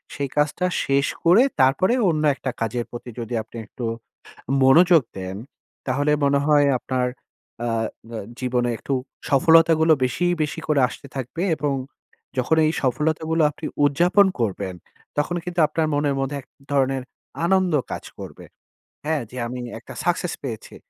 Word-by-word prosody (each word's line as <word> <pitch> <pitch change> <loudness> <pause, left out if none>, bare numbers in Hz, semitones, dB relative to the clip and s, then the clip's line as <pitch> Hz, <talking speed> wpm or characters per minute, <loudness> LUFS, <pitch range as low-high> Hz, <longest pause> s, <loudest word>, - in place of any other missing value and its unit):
সেই 140 -1 -3
কাজটা 150 +5 +1 0.2
শেষ 140 0 +2 0.2
করে 175 +7 +6 0.2
তারপরে 135 - +3 0.2
অন্য 155 -1 0
একটা 130 - -4
কাজের 120 +1 -1
প্রতি 120 +1 -8
যদি 115 +1 -5
আপনি 115 - -12
একটু 115 +3 -7 0.8
মনোযোগ 165 +4 +6 0.2
দেন, 95 0 -5 0.5
তাহলে 145 +3 +1
মনে 140 0 +3
হয় 145 -1 +5
আপনার, 125 0 -1 0.6
আ - - 0 0.5
আ - - -3 0.2
জীবনে 125 -1 0
একটু - - -5 0.4
সফলতাগুলো 160 +2 +5
বেশি, 130 +8 0 0.2
বেশি 155 +2 -3
করে 150 -2 +3
আসতে 140 - -11
থাকবে। 135 +6 -4
এবং 145 -1 -1 0.7
যখন 140 +6 +2
এই 155 - +2
সফলতা 155 +5 0
গুলো 165 0 +2
আপনি 150 +1 -7 0.2
উদযাপন 175 +8 +4
করবেন, 100 -4 -2 0.4
তখন 160 +4 0
কিন্তু 175 -1 -2
আপনার 160 -1 0
মনের 145 -1 +1
মধ্যে 135 +1 -2
এক 135 - -21 0.3
ধরনের 135 -1 +1 0.4
আনন্দ 185 -1 +2 0.2
কাজ - - -5
করবে। - - -9 0.6
হ্যাঁ, 155 -2 0
যে 130 - -9
আমি 125 +1 -6 0.2
একটা - - -11
success 175 0 0
পেয়েছি। 115 -6 -6
145 Hz, 150 wpm, -23 LUFS, 130-160 Hz, 0.8 s, করে